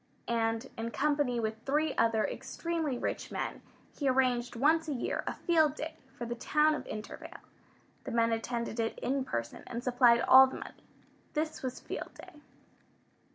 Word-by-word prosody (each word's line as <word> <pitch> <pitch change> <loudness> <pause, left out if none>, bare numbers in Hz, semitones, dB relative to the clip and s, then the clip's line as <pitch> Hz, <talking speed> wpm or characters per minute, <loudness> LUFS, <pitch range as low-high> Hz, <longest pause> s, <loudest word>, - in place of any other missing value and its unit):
And 225 +1 0
in 230 +1 -2
company 285 -2 +1
with 220 0 -2
three 300 +3 +1
other 225 -2 +3
extremely 325 -6 -3
rich - - -3
men - - -3 0.3
he 280 -3 0
arranged, 250 -2 +1
once 315 +6 +3
a 300 - -1
year, 240 - -2
a - - -2
Field 315 -4 +3
Day 310 +1 -5 0.2
for 240 - -4
the 235 - -3
town 305 +5 +2
of 300 - -5
Intervale. 215 0 -7 0.7
The - - -4
men 230 0 +2
attended 235 0 -2
it 225 0 -1
in 270 +1 -1
person, 115 - -4
and 240 0 -5
supplied 245 -2 +5
all 265 +1 +9
the 260 - -7
money. - - -11 0.5
This 310 0 -2
was 255 -1 -4
Field - - -6
Day. 360 -5 -13
255 Hz, 165 wpm, -31 LUFS, 230-300 Hz, 0.7 s, all